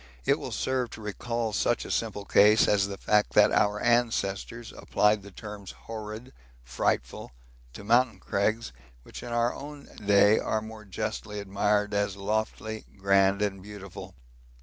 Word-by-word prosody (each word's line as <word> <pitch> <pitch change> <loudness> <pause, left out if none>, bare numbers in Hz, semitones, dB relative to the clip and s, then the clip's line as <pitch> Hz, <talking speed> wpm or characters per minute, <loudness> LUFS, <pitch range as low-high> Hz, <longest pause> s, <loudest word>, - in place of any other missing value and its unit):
It - - +3
will - - -5
serve 130 -2 -1
to 110 - -9
recall 115 +2 -3
such - - +1
a - - -6
simple 100 - -2
case 105 +2 +5
as 100 -1 +3
the 100 -1 -6
fact 105 +1 +2
that 105 - +6
our 105 0 +2
ancestors 115 -1 0
applied 105 0 +2
the 100 - -11
terms 105 0 -9
horrid, 110 +3 -7 0.3
frightful, - - -2 0.4
to 100 - -9
mountain 115 0 +3
crags 110 - -1 0.3
which - - -10
in 120 - -7
our 120 +1 +1
own 145 0 -9 0.2
day 100 +1 +5
are 110 - 0
more 110 0 -10
justly 105 +1 -4
admired 105 +1 0
as 100 -1 0
lofty, 110 +2 -2
grand, 100 +1 +3
and 95 -2 -2
beautiful. 100 -2 -10
105 Hz, 150 wpm, -28 LUFS, 100-110 Hz, 0.4 s, that